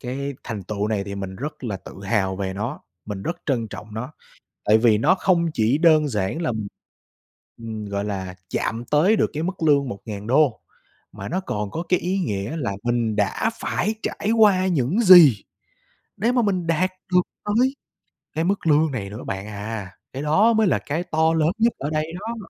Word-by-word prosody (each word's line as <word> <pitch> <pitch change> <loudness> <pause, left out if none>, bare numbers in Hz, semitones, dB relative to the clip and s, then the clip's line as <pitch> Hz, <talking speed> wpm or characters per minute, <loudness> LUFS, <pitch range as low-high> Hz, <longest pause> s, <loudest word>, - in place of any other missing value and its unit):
cái 140 +2 -4
thành 110 -4 -5
tựu 105 +2 -3
này 105 -3 -1
thì 100 0 -6
mình 95 -1 -6
rất 140 +2 -6
là 105 -4 -2
tự - - -12
hào 95 -2 0
về 95 -1 -3
nó, 115 +9 -4 0.2
mình 100 -2 -6
rất 170 - -3
trân 120 -6 0
trọng 105 +1 -9
nó. 125 +6 -5 0.5
Tại 105 +1 +6
vì 110 -1 +4
nó 150 - +3
không 180 -2 +2
chỉ 115 +5 +2
đơn 155 -2 +5
giản 105 - -2
là, 165 - 0
ừm, 110 -3 -3 1.0
ừm, 110 -2 -5
gọi 100 0 -3
là, 95 -3 -4 0.2
chạm 115 +1 -2
tới 170 +9 +4
được - - +1
cái 155 +1 -3
mức 185 0 -4
lương 140 -3 +3
1.000, 110 +5 0 0.5
mà - - -7
nó 185 +3 -1
còn 105 - -4
có 165 - -3
cái 180 - +2
ý 185 +3 -1
nghĩa 105 - -2
là 120 -10 -2
mình 120 -2 0
đã 105 - +1
phải 215 +5 -1
trải 205 - -2
qua 195 -4 +5
những 170 - +1
gì 175 - +8 0.7
để 230 +5 +1
mà 250 -1 +2
mình 185 -5 0
đạt 170 +3 +1 0.2
được 180 0 +5 0.2
tới 240 +6 +2 0.6
cái 160 - -1
mức 190 -1 -1
lương 155 0 +4
này 100 -7 -4
nữa 105 +4 -8
bạn 95 +1 -5
à. 105 -1 -6 0.2
Cái 135 +2 -4
đó 200 +10 +4
mới 220 -1 +3
là - - +2
cái 155 +4 -3
to 160 -1 +1
lớn 160 -1 +2
nhất 230 +1 +3
ở 140 - -3
đây 155 +1 -2
đó. 230 +3 -5
140 Hz, 200 wpm, -23 LUFS, 105-175 Hz, 1.0 s, gì